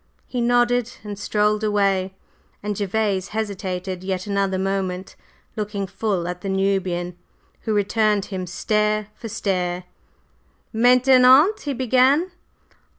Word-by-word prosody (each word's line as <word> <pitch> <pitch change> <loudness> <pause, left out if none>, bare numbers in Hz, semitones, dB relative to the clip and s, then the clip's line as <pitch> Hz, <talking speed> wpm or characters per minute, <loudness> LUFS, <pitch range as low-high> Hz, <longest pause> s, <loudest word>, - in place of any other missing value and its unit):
He 245 - -3
nodded 245 0 +2
and 205 -1 -7
strolled 210 +1 +1
away, 195 -3 +1 0.5
and 210 0 -2
Gervase 200 -1 -1
hesitated 185 -3 -4
yet 185 -1 -3
another 200 -2 0
moment, 190 -1 -3 0.4
looking 210 -2 -3
full 195 -2 -2
at 180 0 -5
the 195 - -4
Nubian, 190 -2 -1 0.5
who - - +2
returned 210 0 +1
him 185 -2 -5
stare 210 +3 0
for 225 - -9
stare. 180 -3 -2 0.9
"Maintenant?" 255 - +5
he 285 - -1
began. 260 +7 +3
205 Hz, 115 wpm, -22 LUFS, 190-225 Hz, 0.9 s, Maintenant